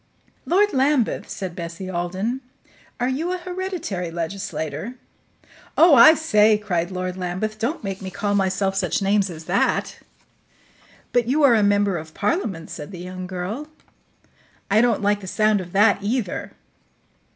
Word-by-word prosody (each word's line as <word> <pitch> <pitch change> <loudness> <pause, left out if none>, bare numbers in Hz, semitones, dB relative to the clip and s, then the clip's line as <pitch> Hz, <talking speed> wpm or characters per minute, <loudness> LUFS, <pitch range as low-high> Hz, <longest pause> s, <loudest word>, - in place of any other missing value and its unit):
"Lord 410 +4 +3
Lambeth," 265 -2 +1
said 185 -4 -5
Bessie 170 +2 -6
Alden, 185 +8 -2 0.6
"are 245 - +1
you 300 +7 -1
a - - -2
hereditary 360 - -4
legislator?" 165 - -4 0.8
"Oh, 330 -1 +7
I 280 +5 +9
say!" 215 -9 +4
cried 180 -5 -2
Lord 185 0 -4
Lambeth, 190 +4 -3
"don't 245 +7 -2
make 195 -1 -4
me 190 - -5
call 205 +2 -2
myself 195 0 +1
such 195 - 0
names 200 0 +2
as 165 -2 -8
that." 185 +4 0 1.1
"But 245 -2 +2
you 290 +4 +2
are 270 -4 +7
a 220 - +4
member 205 -2 +2
of 155 0 -12
Parliament," 195 - -2
said 150 -2 -7
the 190 - -9
young 185 +1 -7
girl. 190 +11 -5 1.0
"I 215 +2 +5
don't 235 -4 +2
like 205 0 +1
the 190 - -8
sound 215 +1 +2
of 175 -1 -10
that, 205 +1 +4
either." 210 -1 -2
205 Hz, 150 wpm, -22 LUFS, 185-245 Hz, 1.1 s, I